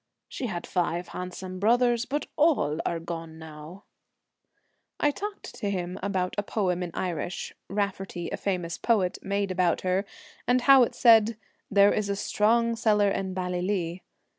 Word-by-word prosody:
She 255 - -4
had 175 -5 -4
five 175 -1 -1
handsome 185 0 -6
brothers, 240 +3 +3
but 290 +2 -2
all 280 - +2
are 170 - -1
gone 165 -1 -6
now! 160 +4 -11 0.6
' - - -48
I 295 - +3
talked 410 +6 -7
to 205 - -3
him 180 -1 -3
about 190 -2 -1
a - - +3
poem 185 -4 -1
in 180 - -3
Irish, 175 -1 -3 0.2
Raftery, 195 -3 -3
a - - -2
famous 180 -4 -2
poet, 200 -6 +1
made 200 0 -1
about 180 -2 +1
her, 185 +1 +1 0.4
and 250 +1 +3
how 270 0 +7
it 240 - +2
said, 225 -2 +5 0.3
'there 200 0 +5
is 210 -1 -1
a 200 - 0
strong 230 +3 +2
cellar 210 -3 +3
in 190 -1 -3
Bally 180 -1 -2
36 180 - -2
lee.' 180 -3 -2
195 Hz, 165 wpm, -27 LUFS, 180-220 Hz, 0.6 s, how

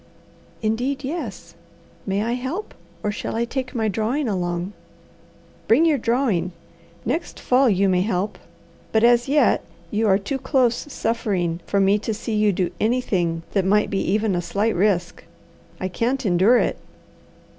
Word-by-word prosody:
"Indeed 250 +6 -1
yes. 250 - -5 0.5
May 195 +2 0
I 230 - -1
help, 260 - -4 0.3
or 210 - 0
shall 210 - -4
I 235 +1 +1
take 260 +2 -4
my 220 -2 +1
drawing 225 +7 -1
along?" 180 -1 -2 0.9
"Bring 275 +9 +5
your 305 -4 +3
drawing. 225 -8 0 0.5
Next 300 +10 -2
fall 255 0 +3
you 200 -1 +3
may 180 -1 +3
help, 195 0 -1 0.5
but 220 0 +2
as 240 +1 +5
yet 295 +1 +3 0.3
you 220 +1 +1
are 190 -1 +5
too 210 +7 -3
close 260 0 +1
suffering 195 -9 -1
for 200 - +1
me 195 +2 +4
to 220 +1 -3
see 220 +1 -4
you 210 -1 +3
do 180 -1 -1
anything 185 -8 0
that 195 - +1
might 210 +3 +2
be 195 - 0
even 210 +1 +1
a 175 - 0
slight 200 +6 0
risk. 180 -2 0 0.6
I 185 - -2
can't 245 +8 -1
endure 195 +6 +4
it." - - 0
215 Hz, 155 wpm, -22 LUFS, 190-250 Hz, 0.9 s, Bring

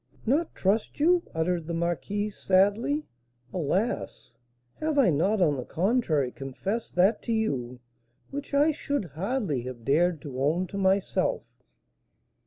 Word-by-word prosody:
"Not 295 +8 +1
trust 205 +8 0
you?" 345 +4 +4
uttered 165 0 0
the 170 - -2
marquise, 175 +5 -2
sadly; 205 +10 +2 0.5
"alas! 165 - -2 0.5
have 310 -1 -1
I 255 -10 +5
not 185 +7 +2
on 150 -4 +2
the 125 - -3
contrary 165 - +1
confessed 185 - -4
that 190 +5 +3
to - - -4
you 130 - -1 0.5
which 285 0 -6
I 290 +2 +4
should 285 -6 -2
hardly 180 - -2
have 120 -3 -8
dared 165 +4 +2
to 135 -4 -5
own 160 +6 +2
to 200 - -6
myself?" 190 0 +1
190 Hz, 135 wpm, -27 LUFS, 150-230 Hz, 0.5 s, I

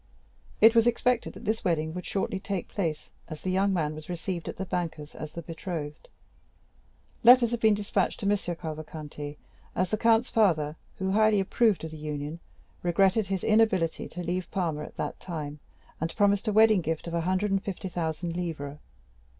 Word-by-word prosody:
It 225 +1 +8
was 230 0 +5
expected 245 0 +1
that - - -11
this 220 +2 0
wedding 160 -3 0
would 180 0 -6
shortly 195 0 -1
take 190 -2 -3
place, 165 -7 -3 0.2
as 155 -2 -8
the 185 - -1
young 195 +2 +2
man 155 -5 0
was 155 +1 -10
received 175 0 -4
at - - -6
the 190 - -3
banker's 165 -5 -4
as 155 - -7
the 170 - -6
betrothed. 160 -2 -6 1.1
Letters 240 0 +8
had 235 - -1
been 220 -2 +5
despatched 200 -2 -1
to - - -3
M. 205 +1 +4
Cavalcanti, 155 -4 -6 0.4
as 185 0 0
the 215 - 0
count's 230 +1 +3
father, 160 -9 +2 0.2
who 190 0 -2
highly 215 0 +4
approved 205 0 +2
of 160 - -5
the 160 - -8
union, 150 +1 -4 0.4
regretted 195 +4 +3
his 195 -2 -2
inability 215 -7 +2
to 180 - -6
leave 180 +1 -2
Parma 165 -5 -1
at - - -13
that - - -3
time, 150 -4 -5 0.4
and 165 +1 -3
promised 205 +1 +3
a - - +3
wedding 215 -2 +6
gift 160 -1 -2
of 170 - -5
a 170 - +1
hundred 185 +4 0
and 195 0 +2
fifty 195 -1 -5
thousand 170 -1 -3
livres. 150 -5 -4
180 Hz, 185 wpm, -28 LUFS, 160-205 Hz, 1.1 s, It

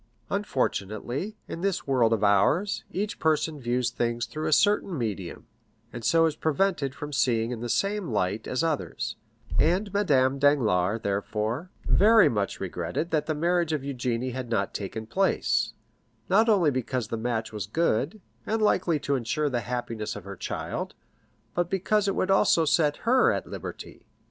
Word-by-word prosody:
Unfortunately, 135 - -2
in 165 - -6
this 195 -1 -1
world 125 -5 +3
of 110 -2 +1
ours, 105 - +2
each 205 +2 -3
person 155 -1 +1
views 125 0 0
things 120 0 -1
through 155 +6 -4
a - - 0
certain 200 0 +3
medium, 105 -8 -4 0.5
and 120 - -7
so 165 +5 +4
is 160 -2 0
prevented 155 -4 0
from 145 +1 -7
seeing 115 -3 +1
in 120 - -4
the 120 +1 -4
same 200 - 0
light 100 0 -1
as 130 +4 -1
others, 160 -3 -2 0.4
and 185 +5 +2
Madame 140 -9 +2
Danglars, 115 -8 +2
therefore, 105 - -2 0.2
very 220 0 +6
much 100 -3 -2
regretted 90 - -3
that 155 -1 0
the 155 - 0
marriage 170 +1 +1
of 150 - -1
Eugénie 125 -2 -2
had 130 -2 -5
not 100 -4 0
taken 110 +2 -5
place, 190 - +1 0.6
not 220 +5 +4
only 180 -8 +4
because 130 -3 -2
the - - -2
match 110 -1 -2
was 105 -3 -4
good, 160 - 0 0.3
and 220 +1 0
likely 185 -6 +2
to 140 -1 -2
insure 140 +5 -1
the 120 - 0
happiness 115 -2 -4
of 105 - -8
her 100 +1 -8
child, - - -4 0.6
but 175 -1 0
because 200 +2 +1
it 195 - 0
would 190 - +1
also 170 -4 +4
set 150 -1 +2
her 255 +2 +5
at - - -2
liberty. - - -8
140 Hz, 165 wpm, -27 LUFS, 115-175 Hz, 0.6 s, very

